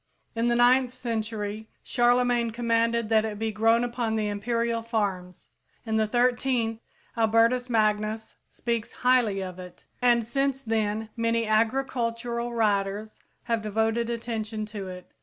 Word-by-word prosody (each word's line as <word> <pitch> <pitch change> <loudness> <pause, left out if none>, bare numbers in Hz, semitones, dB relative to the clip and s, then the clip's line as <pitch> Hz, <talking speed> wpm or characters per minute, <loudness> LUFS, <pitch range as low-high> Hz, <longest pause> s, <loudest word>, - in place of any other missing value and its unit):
In 230 +1 +1
the 240 - +2
ninth 245 +1 +4
century, 220 -3 -4 0.2
Charlemagne 245 -1 +2
commanded 230 0 +1
that 220 -1 +4
it 215 -2 -4
be 220 +1 -2
grown 225 +2 +3
upon 240 -2 -1
the 215 -1 0
imperial 230 +3 -1
farms; 200 -6 -3 0.4
in 220 -1 0
the 220 0 +2
thirteenth, 240 -1 +1 0.4
Albertus 230 +2 +3
Magnus 215 -1 0
speaks 235 -2 -3
highly 235 -6 +3
of 185 -1 -7
it; 180 -1 -11 0.2
and 240 -2 +4
since 270 +2 -1
then 220 -1 -1
many 230 0 +1
agricultural 235 +1 0
writers 210 -1 0 0.3
have 230 -2 -1
devoted 225 +2 0
attention 225 -2 -3
to 210 -2 -7
it. 180 -1 -9
230 Hz, 135 wpm, -26 LUFS, 215-240 Hz, 0.4 s, ninth